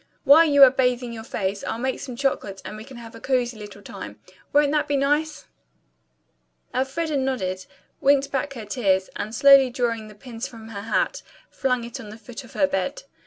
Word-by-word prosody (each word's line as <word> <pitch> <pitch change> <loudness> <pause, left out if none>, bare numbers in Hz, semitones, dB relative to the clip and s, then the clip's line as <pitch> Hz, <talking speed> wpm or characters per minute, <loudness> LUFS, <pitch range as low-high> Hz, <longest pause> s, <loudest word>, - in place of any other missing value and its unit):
While 310 +4 +7
you 285 -3 +6
are 260 - +9
bathing 250 -2 0
your 225 -1 -7
face, 195 -2 -3
I'll - - -3
make 260 +2 -2
some 255 -3 -7
chocolate 235 -7 -2
and - - -6
we'll 215 +3 -10
have 230 -1 -10
a 230 - -11
cozy 250 -3 0
little 205 -1 -10
time. - - -9 0.3
Won't 290 0 +4
that 300 -1 +1
be 285 -1 +1
nice?" 295 +3 0 1.3
Elfreda 280 +4 -1
nodded, 190 -9 -2 0.3
winked 275 0 +3
back 275 +1 -2
her 230 -5 -8
tears, 195 -4 0
and 215 +2 -4
slowly 275 -2 +7
drawing 235 -3 -2
the 210 - -13
pins 235 +2 -7
from 225 -4 -12
her 200 -3 -6
hat, - - 0 0.3
flung 250 -3 0
it 235 +3 -7
on 220 -5 -9
the 215 - -10
foot 235 +4 -10
of 245 - -15
her 285 - +3
bed. 285 +12 -2
250 Hz, 195 wpm, -24 LUFS, 220-275 Hz, 1.3 s, are